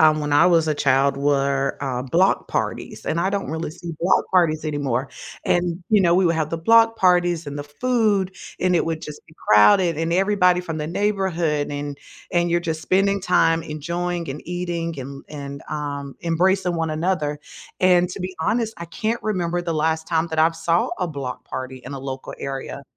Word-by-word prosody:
um, 155 -1 +5
when 150 -1 -2
I 145 +4 +6
was 165 -3 +4
a 155 - +2
child 140 0 +2
were, 140 -1 +1
uh, 130 -3 -2
block 170 +9 +2
parties, - - -3
and 165 - 0
I 190 - +1
don't 200 -6 -2
really 160 -1 -3
see 170 +1 -8
block 175 +3 +3
parties 165 -4 +3
anymore, 140 -4 -1 0.4
and, 175 0 0
you 215 -2 +4
know, 170 -2 +4
we 190 - +4
would 170 - +2
have 155 -1 -1
the 165 - -1
block 225 +5 +5
parties, 175 -2 +3
and 145 0 -5
the 145 - -5
food, 205 +2 0 0.3
and 180 -1 +2
it - - +2
would 165 -1 -3
just 150 -1 -8
be 155 - -19
crowded, 105 - +5
and 165 +1 -1
everybody 180 -1 +3
from 165 -3 -5
the 150 - -3
neighborhood 175 -5 0
and 145 0 -4 0.4
and 175 -1 +2
you're, 175 0 +2
just, 160 -2 -3
spending 195 +2 +2
time 165 -3 +3
enjoying, 170 +3 -3
and 135 +2 -6
eating 170 -3 -3
and 140 +1 -7
and, 140 -2 -7
um, 140 -2 -4
embracing 180 +2 +1
one 165 -1 -1
another, 155 -2 -1 0.4
and 180 -1 +4
to 180 - -7
be 185 +1 -4
honest, 225 +6 0
I 170 - -5
can't 220 +7 -3
remember 175 -4 -1
the 170 -2 -2
last 160 +1 0
time 160 0 +1
that 160 -1 -4
I've 165 +1 +3
saw 165 +1 +1
a 180 - 0
block 140 -5 -6
party 130 0 -6
in 130 - -7
a 135 - -5
local 135 0 -6
area, 135 0 -5
165 Hz, 200 wpm, -22 LUFS, 145-180 Hz, 0.4 s, I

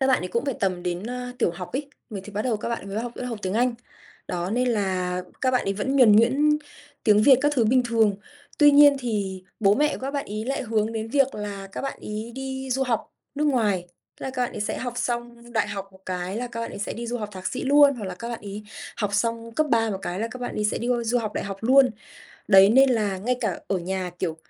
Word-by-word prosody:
Các 265 - +3
bạn 265 - +4
ấy 180 - -4
cũng 235 - -1
phải 275 -4 -1
tầm 185 -3 0
đến, 180 +3 -3
a, 250 0 -5
tiểu 205 - +2
học 180 +1 -8
ấy, 280 +2 -3 0.2
người 200 -3 -5
thì 210 - -10
bắt 210 +2 -2
đầu 240 -4 0
các 210 - -5
bạn 230 -4 -4
mới 200 +2 -3
học 240 +1 -4
mới 250 - -4
học 230 -3 -4
tiếng 185 +2 -2
Anh. 245 +1 +2 0.5
Đó, 175 +1 -2
nên 250 +3 +1
là 185 -5 -1 0.2
các 260 - +2
bạn 250 -1 +1
ấy 195 - 0
vẫn 265 +7 -1
nhuần 225 -6 +7
nhuyễn 285 +7 +4 0.5
tiếng 210 -1 +5
Việt 265 0 +7
các 290 0 +2
thứ 240 - +3
bình 250 +3 +4
thường. 220 -4 +3 0.4
Tuy 295 -1 +8
nhiên 285 0 +7
thì 200 -6 -3 0.2
bố 200 0 +5
mẹ 300 +4 +2
của - - -12
các 270 +1 -3
bạn 280 -1 -3
ấy 215 +2 -4
lại 270 +2 -2
hướng 220 -2 0
đến 220 0 -3
việc 275 +1 +2
là 200 -2 -6
các - - -4
bạn 275 - -4
ấy 215 +2 -6
đi 265 0 -5
du 265 +2 +1
học 245 -4 -2 0.2
nước 295 +1 0
ngoài, 210 -10 +1 0.3
tức - - -9
là 265 - -2
các 255 -1 -2
bạn - - -5
ấy - - -6
sẽ 210 - -2
học 245 -2 -3
xong 240 -1 -4
đại 225 - +1
học 195 0 -5
một 190 - -18
cái 180 +1 -3
là 245 +2 -2
các 235 -1 -6
bạn 230 - -4
ấy - - -8
sẽ 200 - -3
đi 235 +1 -6
du 245 +1 -2
học 210 -2 -4
thạc 185 -1 -7
sĩ 255 - -3
luôn, 285 0 +6
hoặc 225 - -6
là 185 -1 -4
các 230 +6 -7
bạn 235 -1 -5
ấy 205 +1 -7 0.3
học 205 -3 -1
xong 230 +2 -1
cấp 310 +5 +1
3 225 -1 +3
một 195 - -3
cái 180 +2 -3
là 230 - -1
các 255 - -7
bạn 245 - -4
ấy 210 - -1
sẽ 210 - 0
đi 240 - -3
qua 240 -1 +1
du 240 +2 +2
học 220 -3 -3
đại - - -2
học 195 -1 -5
luôn. 260 +3 +5 0.6
Đấy, 195 -1 +8
nên 265 +3 +6
là 210 -5 0
ngay 245 +6 0
cả - - -2
ở 195 - +1
nhà, 185 +1 -3
kiểu, 165 -3 -2
230 Hz, 280 wpm, -25 LUFS, 200-255 Hz, 0.6 s, Tuy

